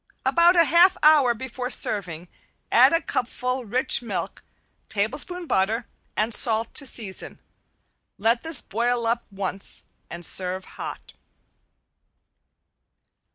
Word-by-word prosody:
About 345 +1 +4
a 340 - +5
half 345 +3 +4
hour 295 -6 +5
before 250 +1 -6
serving 180 -8 +2 0.4
add - - +6
a 330 +1 +1
cupful 250 +1 -3
rich 245 +5 +1
milk, 235 - -5 0.5
tablespoon 290 - -3
butter, 220 -1 -1 0.3
and 220 +2 -1
salt 225 0 +3
to 280 - +1
season. 205 -7 -4 0.8
Let 230 +3 +1
this 325 -4 +3
boil 235 +2 -2
up 235 +1 -1
once, 195 -1 -5 0.3
and 170 0 -3
serve 185 +1 0
hot. - - -10
235 Hz, 110 wpm, -23 LUFS, 205-270 Hz, 0.8 s, add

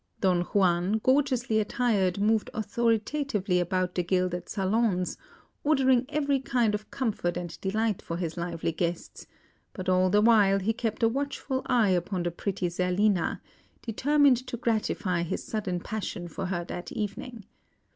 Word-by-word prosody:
Don 180 -3 +2
Juan, 180 0 +2
gorgeously 255 -1 +2
attired, 205 -5 +1
moved 215 +1 +2
authoritatively 220 -2 0
about 180 +1 0
the 180 - 0
gilded 180 0 -1
salons, 195 -2 0 0.5
ordering 265 -4 +3
every 285 -2 +1
kind 245 -5 +1
of 210 0 -4
comfort 210 -9 -2
and 175 -2 -6
delight 215 +1 0
for 170 - -5
his 170 -2 -3
lively 170 -1 -2
guests; 170 +1 -4 0.5
but 185 -2 -6
all 185 0 +3
the 205 +3 +4
while 210 -4 +5
he 200 +3 0
kept 225 -1 -3
a - - +6
watchful 270 +1 -2
eye 235 -5 +3
upon 180 0 0
the 175 - -1
pretty 185 +1 -2
Zerlina, 180 +2 +1 0.4
determined 280 +3 +3
to 250 -1 -4
gratify 215 -6 0
his 170 - -3
sudden 195 -5 -3
passion 180 -3 -5
for 175 +3 -5
her 175 -2 -2
that 175 0 -6
evening. 215 +1 -5
205 Hz, 145 wpm, -28 LUFS, 180-235 Hz, 0.5 s, a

